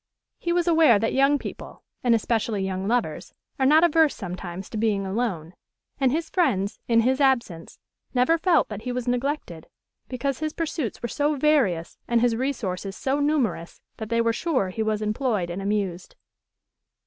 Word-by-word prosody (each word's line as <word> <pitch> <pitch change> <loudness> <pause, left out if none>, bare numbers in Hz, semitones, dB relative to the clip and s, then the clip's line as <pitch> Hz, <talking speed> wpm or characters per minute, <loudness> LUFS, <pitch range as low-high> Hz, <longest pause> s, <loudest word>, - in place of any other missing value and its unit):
He 345 - -2
was 350 0 +1
aware 320 -9 +5
that 225 +2 -1
young 275 +2 +4
people, - - -9 0.2
and 240 -2 +4
especially 220 -3 -1
young 190 0 -3
lovers, 240 +2 -2 0.2
are 265 - +3
not 310 +4 +6
averse 320 -3 +4
sometimes 185 -1 -6
to 220 - -4
being 210 -3 +1
alone; 190 -6 -3 0.5
and 265 -2 +3
his 320 +3 -1
friends, 220 - 0
in 230 -1 +4
his 260 +4 +1
absence, 235 -12 0 0.3
never 265 +7 +2
felt 330 -4 +3
that 210 -1 -6
he 250 - -4
was 250 0 -4
neglected, 245 - -2 0.4
because 260 +1 -2
his 310 0 -3
pursuits 315 -9 -3
were - - 0
so 295 +5 0
various 260 - +1
and 235 -1 +2
his 235 -1 +2
resources 205 -7 -3
so 275 +2 -1
numerous 285 - -1 0.2
that 220 -1 -6
they 230 0 +2
were 230 0 +1
sure 260 - 0
he 200 +4 -4
was 215 -1 -1
employed 215 -5 -1
and 185 +3 -4
amused. 195 -3 -2
235 Hz, 170 wpm, -24 LUFS, 200-280 Hz, 0.5 s, not